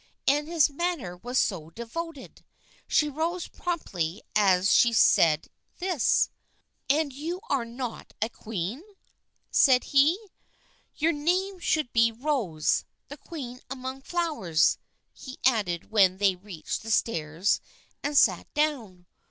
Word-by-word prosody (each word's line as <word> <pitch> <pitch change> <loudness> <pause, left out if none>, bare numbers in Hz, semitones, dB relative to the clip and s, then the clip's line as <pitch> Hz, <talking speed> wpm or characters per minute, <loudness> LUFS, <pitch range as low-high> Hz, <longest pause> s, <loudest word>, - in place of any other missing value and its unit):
And 295 +2 +3
his 330 -3 +4
manner 290 - -3
was 245 +8 -4
so 165 -10 0
devoted! 275 - -7 0.4
She 300 - +3
rose 325 +5 -2
promptly 195 - -3
as 195 -2 +4
she 235 -1 +5
said 160 -8 +4 0.3
this. 360 -7 +2 0.3
" - - -45
And 295 +1 +2
are - - -16
you 330 +6 -4
not 240 -2 -3
a 220 - +1
queen? 220 - -5 0.4
" - - -53 0.3
said 255 -3 +5
he. 285 +5 +4 0.4
" - - -37
Your 320 +2 +2
name 365 +6 0
should 310 -6 0
be 230 0 +4
Rose, 225 - 0 0.3
the 290 - -8
queen 255 -5 -8
among 260 0 -6
flowers," 295 - +1 0.3
he 260 -1 -10
added 205 -10 +1
when 190 -4 +4
they 195 -1 +3
reached 180 -3 -6
the 225 - -8
stairs 170 -4 +1 0.4
and 290 0 -1
sat - - +3
down. 240 -13 -1
250 Hz, 135 wpm, -27 LUFS, 195-300 Hz, 0.4 s, she